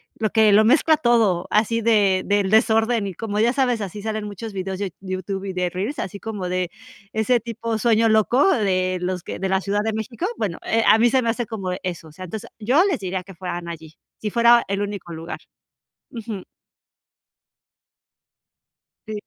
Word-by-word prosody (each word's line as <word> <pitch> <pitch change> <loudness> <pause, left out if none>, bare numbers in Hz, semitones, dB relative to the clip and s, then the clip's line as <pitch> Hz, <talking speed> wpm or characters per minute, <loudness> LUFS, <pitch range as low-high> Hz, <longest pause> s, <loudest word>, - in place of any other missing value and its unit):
lo 215 -2 -1
que 220 -2 +4
lo 215 - +6
mezcla 295 +7 +4
todo, 225 - +2
así 230 +2 +2
de 205 -4 +3
del 200 -1 +1
desorden, 220 -1 +3
y 190 - -6
como 210 0 -3
ya 230 +2 +4
sabes, 250 -4 +1
así 200 +1 -6
salen 215 -1 -3
muchos 205 +1 -7
videos 190 0 -4
de 195 -3 -4
YouTube 190 +1 -4
y 190 - -4
de 180 -1 -1
reels 205 +12 -3
así 200 +1 -5
como 205 -5 -5
de, 180 -1 -1 0.4
ese 220 +3 +2
tipo 230 0 -4
sueño 225 -1 +3
loco 230 - +4
de 185 - +1
los 180 -1 -2
que - - -6
de 190 0 -1
la 190 0 +2
Ciudad 205 +1 0
de 220 - 0
México. 225 - -3
Bueno, 180 -6 -3
eh, 225 0 +1
a 220 - +6
mí 240 +1 +5
se 260 -1 +2
me 230 - 0
hace 240 -1 -3
como 195 -5 -4
eso, 175 -3 -5
o - - -16
sea, 185 +4 -9
entonces 200 +4 -7
yo 255 +11 +3
les 360 -10 0
diría 185 -1 -3
que 195 - -12
fueran 175 -1 -5
allí, 160 -2 -9 0.2
si 215 - -3
fuera 235 +1 +5
el 200 +1 -1
único 200 -4 -6
lugar. 165 +1 -7 0.7
Ujú. 220 -5 -6 2.6
Sí. 215 - -6
210 Hz, 195 wpm, -22 LUFS, 185-230 Hz, 2.6 s, lo